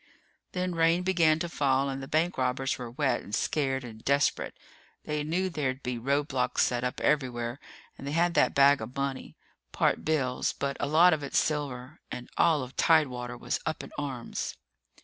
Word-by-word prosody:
Then 180 0 -1
rain 165 +1 +3
began 170 -4 +3
to 175 - -3
fall 140 -4 +1
and 135 0 -4
the 135 - -7
bank 165 +4 +1
robbers 130 +1 0
were 120 -1 -5
wet 130 0 0
and 100 - -4
scared 135 -3 0
and 110 -2 -10
desperate. 140 0 +1 0.5
They 150 -1 -2
knew 175 +5 0
there'd 140 -6 -2
be 125 -1 -3
roadblocks 135 -1 +1
set 120 0 0
up 125 - -2
everywhere 125 -3 0 0.4
and 140 - -7
they 140 - -3
had 170 +1 +2
that - - +3
bag 140 -2 +6
of 115 +3 -7
money 140 -1 -4 0.3
part - - +1
bills, 135 -5 0
but 140 0 -3
a - - -1
lot 165 +4 +6
of 155 - -1
it 140 - -6
silver 140 -2 -1
and 125 - -7
all 155 -5 +3
of 130 +1 -10
Tidewater 125 -7 +2
was 120 0 -2
up 160 -1 -3
in - - -10
arms. 135 -5 -4
140 Hz, 185 wpm, -28 LUFS, 125-155 Hz, 0.5 s, bag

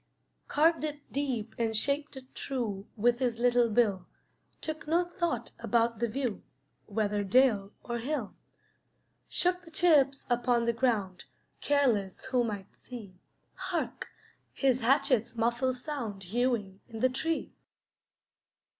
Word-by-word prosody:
Carved 320 +2 +3
it 295 -1 -5
deep 250 -6 -2
and 225 -2 +1
shaped 280 +4 -1
it 260 0 -12
true 220 -7 -3
With 240 +3 +3
his 245 -3 0
little 240 0 +3
bill; 205 -5 +2 0.5
Took 315 -1 -5
no 335 +3 +3
thought 345 -1 -2
about 230 -1 +1
the 235 - +1
view, 240 -2 -2 0.5
Whether 205 -1 0
dale 205 -2 +3
or 235 0 -3
hill. 260 -3 -3 1.0
Shook 360 0 +1
the 340 - -14
chips 300 -5 +3
upon 240 -1 +2
the 235 - +2
ground, 220 -7 0 0.3
Careless 240 -10 +1
who 255 -2 +2
might 205 -4 -5
see. 205 -7 -10 0.3
Hark! 375 -2 -3 0.5
his 260 -2 +2
hatchet's 255 -2 +3
muffled 240 +3 +1
sound 245 -8 -4
Hewing 210 -1 -1
in 225 -1 -7
the 255 - +6
tree. 320 +6 -2
245 Hz, 130 wpm, -30 LUFS, 220-280 Hz, 1.0 s, the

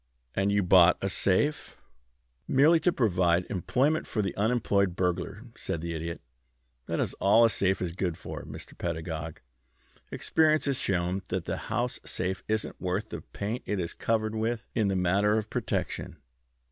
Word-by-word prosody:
"And 95 +1 +1
you 100 0 +2
bought 90 -1 +6
a 95 - -1
safe 135 +11 0 0.4
" - - -45
"Merely 155 +5 +5
to 175 +3 +2
provide 90 - +2
employment 135 - +1
for 105 - -1
the 95 - -3
unemployed 100 -4 +1
burglar," 95 +4 -2
said 85 - -3
the 85 +1 -4
Idiot. 85 +1 -5 0.7
"That - - -2
is - - 0
all 110 +4 +6
a 115 - +3
safe 95 -2 +1
is 85 - -2
good 85 -1 -2
for, - - -7
Mr. - - -10
Pedagog. 80 -1 -4 0.7
Experience 155 -1 +2
has 140 -2 0
shown 90 0 0
that 95 -2 -3
the - - -2
house 120 +4 -1
safe 95 0 -2
isn't 110 0 -2
worth 95 +4 -2
the - - -6
paint 110 +5 -5
it 105 - -1
is 85 -1 -2
covered 110 -1 0
with 110 +1 -2
in 110 -3 +1
the 95 - 0
matter 100 +4 +2
of 110 -1 -3
protection. - - -3
100 Hz, 170 wpm, -28 LUFS, 90-110 Hz, 0.7 s, bought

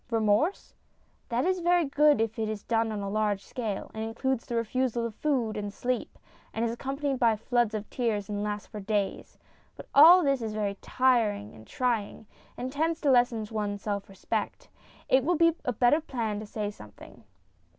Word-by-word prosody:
Remorse? 225 - +1 0.6
That 240 +2 0
is 370 0 +1
very 350 -1 +3
good 290 -1 +4
if 225 +1 -1
it 220 -1 -1
is 215 -2 -5
done 225 -1 0
on 210 -1 -3
a 200 - -4
large 210 -2 0
scale, 220 -6 -4
and 220 - -4
includes 235 +3 -2
the 240 - -3
refusal 235 +1 0
of 230 - -4
food 245 -4 -1
and 205 -1 -4
sleep, 245 +4 -3 0.4
and 225 - 0
is 230 - -1
accompanied 270 +2 -3
by 230 -3 +4
floods 235 0 0
of 210 0 -4
tears, 220 -5 -1
and 205 -1 -3
lasts 210 0 -3
for 210 - -9
days. 205 -1 -2 0.4
But - - -12
all 345 +5 +9
this 275 -3 +1
is 220 -2 -4
very 205 -2 -1
trying, 225 -6 +1
and 230 - -4
tends 320 +3 0
to 285 - +3
lessen 240 -3 +3
one's 205 -2 -3
self 200 -2 -3
respect. 195 - -4 0.4
It 260 0 +4
will 350 +5 +2
be 335 0 +5
a 250 - +1
better 245 +7 +3
plan 230 -8 -3
to 215 - -8
say 210 -1 -3
something. 105 - -14
230 Hz, 180 wpm, -28 LUFS, 210-260 Hz, 0.6 s, all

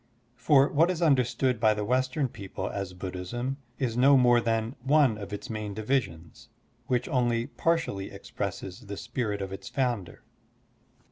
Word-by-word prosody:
For 135 +2 +4
what 160 +4 +3
is 180 -3 -1
tmderstood 130 -5 +2
by 110 -1 +4
the 105 0 -2
Western 130 +4 +1
people 95 -4 -6
as 95 -2 -5
Buddhism 95 +9 -4 0.2
is 120 -4 -1
no 135 +3 +6
more 120 -2 +5
than 115 +2 -1
one 135 -2 +4
of 100 -2 -8
its 105 +4 -5
main 110 -4 -5
divisions, 105 -8 -3 0.4
which 125 -1 0
only 120 -3 +1
partially 145 -6 -1
expresses 95 +2 -6
the 100 0 -6
spirit 105 -6 -3
of 95 0 -6
its 95 - -7
founder. 120 -8 -2
120 Hz, 150 wpm, -28 LUFS, 100-130 Hz, 0.4 s, no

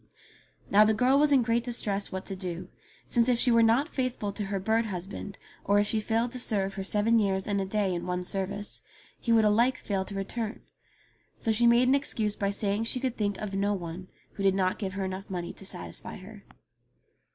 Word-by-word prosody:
Now 210 +2 +7
the 215 0 +3
girl 255 +5 +4
was 300 0 +4
in 265 -3 +5
great 230 +1 +1
distress 205 -5 -1
what 190 0 -5
to 195 - -5
do, 180 -1 -5 0.4
since 235 +1 +2
if 245 - +3
she 245 - +3
were 230 0 +5
not 230 +6 +4
faithful 255 -9 -2
to 205 0 -3
her 195 0 -2
bird 220 +4 +1
husband 195 +1 -6 0.3
or 200 +1 +3
if 205 - +4
she 220 +1 0
failed 225 +3 0
to 255 - -6
serve 195 -5 0
her 195 -1 -4
seven 215 +4 +3
years 190 -2 0
and 200 -1 0
a - - -1
day 195 -1 0
in 175 0 -4
one 180 0 -1
service, 200 +2 -2 0.4
he 235 - -1
would 225 -1 +5
alike 235 +5 +3
fail 195 -2 -2
to 200 - -7
return; 215 +3 -4 0.8
so 225 - 0
she 235 +2 +4
made 240 +2 +5
an 260 - +5
excuse 220 -7 0
by 200 - -1
saying 200 +2 -1
she 255 - -2
could 255 -2 -2
think 205 -2 -1
of 210 -2 -5
no 200 +1 +1
one, 175 0 -6 0.3
who - - -7
did 195 -1 +3
not 185 -1 0
give 195 -3 -3
her 195 0 -2
enough 190 +2 -5
money 175 -2 -4
to 195 - -7
satisfy 85 - -5
her. - - -12
205 Hz, 220 wpm, -28 LUFS, 195-230 Hz, 0.8 s, Now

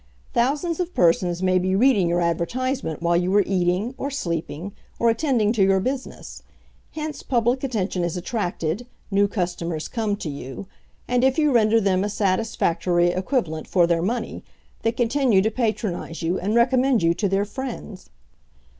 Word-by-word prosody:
Thousands 295 +8 0
of 360 0 -3
persons 175 +1 +2
may 185 0 +3
be 185 +1 0
reading 210 -5 +4
your 175 +1 +1
advertisement 170 - -2
while 170 0 +2
you 180 +2 +1
are 205 - +5
eating, 185 +5 0
or 280 - -2
sleeping, 170 - -4 0.3
or 235 0 +3
attending 230 -4 +1
to 220 - 0
your 190 0 +4
business; 260 +6 -5 0.5
hence 305 -2 -5
public 245 +1 0
attention 205 -8 -1
is 175 +1 -2
attracted, 180 0 -3 0.2
new 200 +1 +3
customers 175 -5 -3
come 220 -4 -1
to 200 - -6
you, 140 +3 -6 0.4
and, 250 0 +1
if 265 0 +3
you 300 -2 +3
render 225 -2 +4
them 195 -2 +1
a 205 - -1
satisfactory 185 -4 +1
equivalent 180 - -2
for 175 -2 +3
their 170 -1 +1
money, 225 +5 -3 0.4
they 225 - +1
continue 240 -2 +2
to 220 - +1
patronize 215 -8 -2
you 175 +3 0
and 205 +5 -1
recommend 250 -1 +3
you 165 0 +4
to 200 +3 -1
their 195 +2 +1
friends. 220 -4 -7
200 Hz, 165 wpm, -23 LUFS, 175-245 Hz, 0.5 s, are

